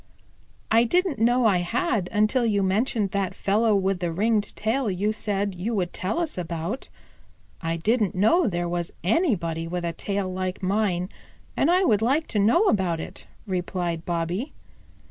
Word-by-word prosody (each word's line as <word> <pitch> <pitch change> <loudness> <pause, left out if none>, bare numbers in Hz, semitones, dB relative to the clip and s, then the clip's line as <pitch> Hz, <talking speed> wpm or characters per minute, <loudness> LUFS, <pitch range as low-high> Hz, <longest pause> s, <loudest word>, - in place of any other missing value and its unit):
"I 225 +1 +6
didn't 355 - +1
know 240 +2 +3
I 200 -4 +4
had 195 - -1
until 215 +4 +2
you 205 -4 +2
mentioned 205 +1 0
that 195 -2 -1
fellow 215 +2 +2
with 195 -1 +1
the 175 -1 -2
ringed 210 +4 0
tail 225 +3 0
you 200 +3 0
said 205 -2 -1
you 200 +6 -3
would 180 -3 -1
tell 190 - -2
us 325 - -2
about. 170 +7 -4 0.7
I 165 -1 -2
didn't 210 +2 +1
know 265 - +4
there 175 -3 -1
was 175 0 -3
anybody 170 - 0
with 175 0 -3
a 170 - -2
tail 200 +1 -2
like 185 0 -4
mine, 185 -2 0 0.5
and 290 - +2
I 365 +2 +4
would 215 - +3
like 275 +8 +2
to 210 - 0
know 230 - +4
about 190 - +1
it," - - -8 0.2
replied 180 -3 -2
Bobby. 175 - -2
200 Hz, 165 wpm, -25 LUFS, 180-230 Hz, 0.7 s, I